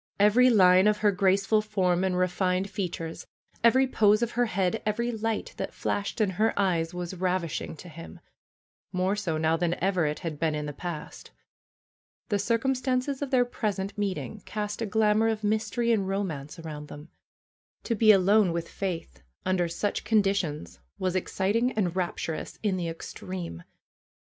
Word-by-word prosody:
Every 220 Hz, +5 st, +6 dB
line 185 Hz, -3 st, +6 dB
of 210 Hz, 0 st, +3 dB
her 205 Hz, -, +6 dB
graceful 195 Hz, +2 st, +2 dB
form 185 Hz, -4 st, +1 dB
and 185 Hz, -1 st, 0 dB
refined 185 Hz, +1 st, 0 dB
features, 175 Hz, -4 st, -4 dB, 0.4 s
every 260 Hz, +3 st, +5 dB
pose 215 Hz, -3 st, +3 dB
of 235 Hz, -, -1 dB
her 245 Hz, 0 st, +1 dB
head, 185 Hz, -3 st, 0 dB
every 235 Hz, +3 st, -1 dB
light 225 Hz, -, -3 dB
that -, -, -5 dB
flashed 200 Hz, +2 st, -2 dB
in 210 Hz, -3 st, +2 dB
her 225 Hz, -1 st, +2 dB
eyes 170 Hz, -4 st, +1 dB
was 175 Hz, 0 st, -5 dB
rav 185 Hz, 0 st, 0 dB
ishing 165 Hz, 0 st, -5 dB
to 180 Hz, -, -11 dB
him, 165 Hz, 0 st, -10 dB, 0.7 s
more 185 Hz, +2 st, 0 dB
so 180 Hz, -7 st, -2 dB
now 160 Hz, +1 st, +2 dB
than 175 Hz, 0 st, 0 dB
ever 185 Hz, -4 st, +1 dB
it 150 Hz, -, -2 dB
had 160 Hz, -5 st, -5 dB
been 160 Hz, -2 st, +1 dB
in 150 Hz, 0 st, -3 dB
the 145 Hz, -, -5 dB
past. 165 Hz, +1 st, -7 dB, 1.0 s
The 205 Hz, -2 st, +1 dB
circumstances 255 Hz, +4 st, 0 dB
of 285 Hz, -, -2 dB
their 255 Hz, -2 st, +3 dB
present 200 Hz, -4 st, -3 dB
meeting 200 Hz, -1 st, -3 dB
cast 210 Hz, +1 st, -4 dB
a 225 Hz, -, -1 dB
glamor 215 Hz, +1 st, +3 dB
of 220 Hz, -1 st, -1 dB
mystery 220 Hz, +3 st, 0 dB
and 200 Hz, -4 st, +1 dB
romance 165 Hz, -8 st, -3 dB
around 155 Hz, -3 st, -7 dB
them. 150 Hz, +2 st, -11 dB, 0.7 s
To 235 Hz, -, -1 dB
be 220 Hz, 0 st, +6 dB
alone 200 Hz, 0 st, +4 dB
with 170 Hz, 0 st, -3 dB
Faith 165 Hz, -, -5 dB, 0.2 s
under 185 Hz, -2 st, +1 dB
such 185 Hz, +5 st, -2 dB
conditions 200 Hz, -, 0 dB, 0.2 s
was 185 Hz, -1 st, -1 dB
ex 185 Hz, -, -2 dB
citing 225 Hz, +6 st, +1 dB
and 185 Hz, -5 st, -1 dB
rapturous 170 Hz, -3 st, -3 dB
in 205 Hz, -3 st, +1 dB
the 175 Hz, -2 st, -2 dB
extreme. 170 Hz, -, -7 dB
195 Hz, 165 wpm, -27 LUFS, 175-215 Hz, 1.0 s, Every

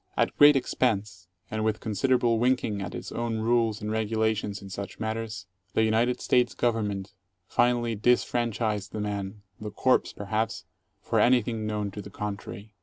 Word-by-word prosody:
At -, -, +1 dB
great 145 Hz, 0 st, +8 dB
expense, 105 Hz, -8 st, -1 dB, 0.2 s
and 110 Hz, 0 st, -1 dB
with 110 Hz, -1 st, 0 dB
considerable 115 Hz, +2 st, +1 dB
winking 120 Hz, -4 st, +1 dB
at 95 Hz, -, -5 dB
its -, -, -7 dB
own 120 Hz, -1 st, -2 dB
rules 115 Hz, -2 st, +1 dB
and 105 Hz, -, -2 dB
regu 110 Hz, 0 st, -1 dB
lations" 110 Hz, -2 st, 0 dB
in 100 Hz, -1 st, -11 dB
such 100 Hz, +1 st, -6 dB
matters, 110 Hz, -1 st, -4 dB, 0.3 s
the 110 Hz, -, +4 dB
United 115 Hz, +3 st, +2 dB
States 125 Hz, -1 st, +2 dB
Government 105 Hz, -5 st, -1 dB, 0.3 s
finally 120 Hz, -1 st, +2 dB
dis 120 Hz, +4 st, +3 dB
franchised 110 Hz, -4 st, -1 dB
the 110 Hz, -, -3 dB
man 100 Hz, 0 st, -4 dB
— 95 Hz, -, -29 dB
the 105 Hz, -, -4 dB
corpse, 130 Hz, +5 st, +2 dB
perhaps, 110 Hz, +2 st, -2 dB, 0.4 s
for -, -, +1 dB
anything 120 Hz, -3 st, +2 dB
known 105 Hz, -1 st, -2 dB
to 105 Hz, -, -7 dB
the 100 Hz, -, -10 dB
contrary. 105 Hz, +1 st, -6 dB
110 Hz, 170 wpm, -27 LUFS, 105-120 Hz, 0.4 s, great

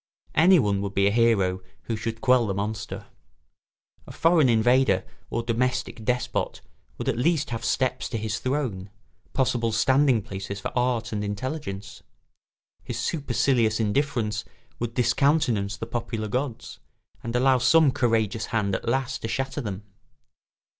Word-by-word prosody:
Anyone 145 Hz, -, +4 dB
would 100 Hz, 0 st, -4 dB
be 100 Hz, -, +3 dB
a 100 Hz, -, +4 dB
hero 100 Hz, -5 st, +2 dB, 0.2 s
who 115 Hz, -, -3 dB
should 115 Hz, +1 st, -4 dB
quell 125 Hz, -2 st, +4 dB
the 100 Hz, -, -2 dB
monster. 105 Hz, +1 st, -4 dB, 1.0 s
A -, -, -8 dB
foreign 165 Hz, -5 st, +3 dB
invader 120 Hz, +3 st, +3 dB, 0.2 s
or 115 Hz, -, -2 dB
domestic 120 Hz, 0 st, -1 dB
despot 125 Hz, +2 st, -1 dB, 0.4 s
would -, -, -5 dB
at -, -, 0 dB
least 155 Hz, -1 st, +1 dB
have 115 Hz, -, -3 dB
steps 130 Hz, -2 st, 0 dB
to 115 Hz, -, -3 dB
his 110 Hz, -1 st, -3 dB
throne, 130 Hz, -8 st, -2 dB, 0.4 s
possible 120 Hz, -4 st, +1 dB
standing 130 Hz, +1 st, +3 dB
places 100 Hz, -1 st, -6 dB
for -, -, -5 dB
art 120 Hz, -2 st, 0 dB
and 105 Hz, -1 st, -2 dB
intelligence; 100 Hz, -3 st, -5 dB, 0.8 s
his 120 Hz, -, -5 dB
supercilious 120 Hz, -4 st, +1 dB
indifference 110 Hz, -2 st, 0 dB, 0.4 s
would 115 Hz, -1 st, -3 dB
discountenance 120 Hz, -5 st, +2 dB
the 115 Hz, -, -5 dB
popular 115 Hz, -2 st, -4 dB
gods, 125 Hz, +2 st, -4 dB, 0.4 s
and 115 Hz, +1 st, -4 dB
allow 130 Hz, +1 st, +4 dB
some 140 Hz, +3 st, +5 dB
courageous 115 Hz, -4 st, 0 dB
hand 105 Hz, -4 st, 0 dB
at 95 Hz, -, -2 dB
last 130 Hz, +1 st, -1 dB
to -, -, -3 dB
shatter 135 Hz, +3 st, -2 dB
them. 100 Hz, -3 st, -5 dB
115 Hz, 140 wpm, -25 LUFS, 105-130 Hz, 1.0 s, some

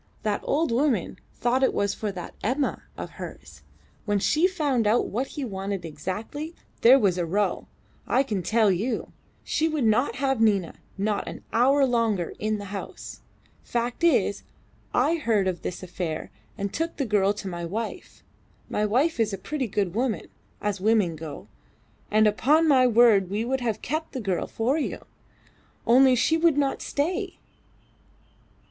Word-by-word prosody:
That 210 Hz, -1 st, 0 dB
old 310 Hz, -1 st, +1 dB
woman 245 Hz, -, 0 dB
thought 245 Hz, +2 st, 0 dB
it 265 Hz, -, +2 dB
was 200 Hz, 0 st, +1 dB
for 210 Hz, -2 st, -3 dB
that 180 Hz, -3 st, -8 dB
Emma 265 Hz, +5 st, -1 dB, 0.2 s
of -, -, -6 dB
hers. -, -, -9 dB, 0.4 s
When 205 Hz, -1 st, +1 dB
she 310 Hz, -, +3 dB
found 285 Hz, -, 0 dB
out 225 Hz, +3 st, +2 dB
what 250 Hz, +6 st, -2 dB
he 285 Hz, -, -5 dB
wanted 195 Hz, -3 st, -4 dB
exactly, 210 Hz, -, -5 dB, 0.3 s
there 250 Hz, +4 st, +8 dB
was 190 Hz, -8 st, +2 dB
a 175 Hz, -, 0 dB
row, 205 Hz, +5 st, 0 dB, 0.4 s
I 265 Hz, -, +3 dB
can 210 Hz, -8 st, -2 dB
tell 220 Hz, +2 st, +3 dB
you. 220 Hz, +6 st, -2 dB, 0.3 s
She 320 Hz, -, 0 dB
would 305 Hz, -4 st, -1 dB
not 225 Hz, +4 st, +2 dB
have 270 Hz, -3 st, 0 dB
Nina 200 Hz, -6 st, +2 dB, 0.2 s
not 205 Hz, +1 st, -1 dB
an -, -, -7 dB
hour 270 Hz, +4 st, +4 dB
longer 225 Hz, -8 st, 0 dB
in 215 Hz, 0 st, 0 dB
the 200 Hz, -1 st, -8 dB
house. 200 Hz, -, -7 dB, 0.4 s
Fact 240 Hz, +5 st, -3 dB
is, 340 Hz, -, +3 dB, 0.5 s
I 335 Hz, -, +2 dB
heard 220 Hz, -10 st, +1 dB
of 180 Hz, -2 st, -2 dB
this 180 Hz, -, -5 dB
affair 175 Hz, -3 st, -4 dB, 0.3 s
and 200 Hz, -2 st, -3 dB
took 330 Hz, +2 st, -2 dB
the 275 Hz, -, 0 dB
girl 205 Hz, -3 st, +2 dB
to 205 Hz, -1 st, -7 dB
my 175 Hz, -2 st, -5 dB
wife. 220 Hz, -, -5 dB, 0.5 s
My 210 Hz, 0 st, +1 dB
wife 265 Hz, +8 st, +1 dB
is 215 Hz, -2 st, +1 dB
a -, -, -2 dB
pretty 265 Hz, +6 st, -3 dB
good 195 Hz, -3 st, -1 dB
woman 235 Hz, 0 st, -1 dB, 0.3 s
as 205 Hz, -2 st, -2 dB
women 210 Hz, -5 st, +2 dB
go 155 Hz, -1 st, -8 dB, 0.6 s
and 215 Hz, +1 st, +4 dB
upon 270 Hz, -, +3 dB
my 260 Hz, -4 st, +5 dB
word 225 Hz, -5 st, +5 dB
we 210 Hz, +4 st, -1 dB
would 265 Hz, +1 st, -1 dB
have 225 Hz, -3 st, -2 dB
kept 315 Hz, +4 st, -3 dB
the 265 Hz, -, -3 dB
girl 195 Hz, -6 st, -1 dB
for 255 Hz, +7 st, 0 dB
you, -, -, -4 dB, 0.8 s
only 255 Hz, +2 st, +6 dB
she 320 Hz, +6 st, +2 dB
would 325 Hz, -3 st, +3 dB
not 280 Hz, -2 st, 0 dB
stay. 365 Hz, +6 st, -2 dB
225 Hz, 165 wpm, -26 LUFS, 200-270 Hz, 0.8 s, there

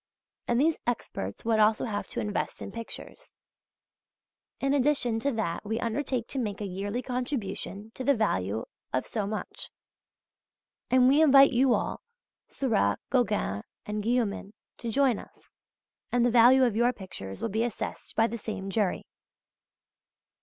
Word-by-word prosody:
And 240 Hz, 0 st, +2 dB
these 315 Hz, +3 st, +2 dB
experts 100 Hz, -, -3 dB
would 225 Hz, -1 st, +2 dB
also 215 Hz, 0 st, +4 dB
have 205 Hz, -3 st, -3 dB
to -, -, -5 dB
invest 210 Hz, -1 st, -2 dB
in -, -, -6 dB
pictures). 230 Hz, -, -9 dB, 1.3 s
In 275 Hz, 0 st, +1 dB
addition 270 Hz, -5 st, +2 dB
to 280 Hz, +5 st, 0 dB
that 205 Hz, -7 st, -2 dB
we 220 Hz, +2 st, -2 dB
undertake 245 Hz, 0 st, -1 dB
to 270 Hz, -, -2 dB
make 210 Hz, -5 st, -3 dB
a 210 Hz, -, -3 dB
yearly 200 Hz, +6 st, -3 dB
contribution 225 Hz, -5 st, -4 dB
to 260 Hz, -, -6 dB
the 280 Hz, +1 st, +4 dB
value 110 Hz, -, 0 dB, 0.3 s
of 130 Hz, -, 0 dB
so 210 Hz, -3 st, -2 dB
much. 215 Hz, +1 st, -5 dB, 1.2 s
And 255 Hz, 0 st, +5 dB
we 280 Hz, +4 st, +5 dB
invite 275 Hz, -3 st, +7 dB
you 250 Hz, 0 st, +4 dB
all, -, -, -3 dB, 0.5 s
Seurat, 215 Hz, -, +1 dB
Gauguin 210 Hz, -, +1 dB, 0.2 s
and 210 Hz, 0 st, -3 dB
Guillaumin 215 Hz, -3 st, -1 dB, 0.3 s
to 235 Hz, -, -4 dB
join 255 Hz, -1 st, +2 dB
us, -, -, -16 dB, 0.6 s
and 245 Hz, -1 st, +3 dB
the 245 Hz, -, +3 dB
value 250 Hz, +3 st, +7 dB
of 240 Hz, -4 st, +2 dB
your 240 Hz, +2 st, +3 dB
pictures 175 Hz, -, -8 dB
will -, -, -2 dB
be 220 Hz, +3 st, 0 dB
assessed 240 Hz, -4 st, -5 dB
by 225 Hz, -, +4 dB
the 235 Hz, 0 st, -3 dB
same 195 Hz, -2 st, -5 dB
jury. 200 Hz, -3 st, 0 dB
230 Hz, 155 wpm, -28 LUFS, 205-250 Hz, 1.3 s, invite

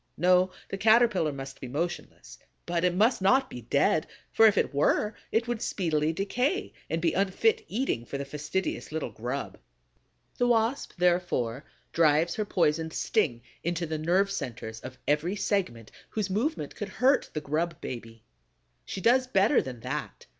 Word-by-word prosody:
No, 180 Hz, +2 st, +4 dB, 0.2 s
the 195 Hz, -, -4 dB
Caterpillar 220 Hz, -7 st, +4 dB
must 135 Hz, -1 st, -8 dB
be 130 Hz, -, -5 dB
motionless; 130 Hz, -, -5 dB, 0.3 s
but 170 Hz, 0 st, -1 dB
it 180 Hz, -1 st, +2 dB
must 220 Hz, +3 st, +3 dB
not 260 Hz, +8 st, +3 dB
be 125 Hz, -, -7 dB
dead, 140 Hz, +6 st, +2 dB, 0.2 s
for 225 Hz, -, +6 dB
if 210 Hz, -, +3 dB
it -, -, +1 dB
were, 180 Hz, +9 st, +2 dB, 0.2 s
it 230 Hz, +2 st, +1 dB
would 240 Hz, -2 st, -2 dB
speedily 160 Hz, -4 st, 0 dB
decay 250 Hz, -, -1 dB, 0.2 s
and 165 Hz, -, -1 dB
be 165 Hz, -1 st, +1 dB
unfit 200 Hz, -, +2 dB
eating 220 Hz, -, -1 dB
for 140 Hz, -, -5 dB
the 140 Hz, -, -4 dB
fastidious 150 Hz, +7 st, -3 dB
little 155 Hz, -6 st, -3 dB
grub. 125 Hz, +6 st, -5 dB, 0.8 s
The 245 Hz, -, +3 dB
Wasp, 235 Hz, +3 st, +1 dB
therefore, 175 Hz, -9 st, +1 dB, 0.3 s
drives 160 Hz, +1 st, +3 dB
her 215 Hz, -, -2 dB
poisoned 160 Hz, -4 st, +1 dB
sting 130 Hz, -, 0 dB, 0.2 s
into 170 Hz, 0 st, -1 dB
the 155 Hz, -1 st, -3 dB
nerve 185 Hz, +5 st, +2 dB
centers 120 Hz, -, -5 dB
of 130 Hz, +2 st, -9 dB
every 150 Hz, +6 st, +1 dB
segment 185 Hz, -, -2 dB, 0.2 s
whose 205 Hz, -3 st, -2 dB
movement 260 Hz, +11 st, -1 dB
could -, -, -5 dB
hurt 265 Hz, +2 st, +2 dB
the 155 Hz, -, -3 dB
grub 160 Hz, +4 st, -2 dB
baby. 115 Hz, -2 st, -8 dB, 0.6 s
She 190 Hz, -, -5 dB
does 255 Hz, +5 st, +4 dB
better 210 Hz, +3 st, +4 dB
than 125 Hz, -3 st, -8 dB
that. -, -, -5 dB
175 Hz, 160 wpm, -28 LUFS, 145-210 Hz, 0.8 s, for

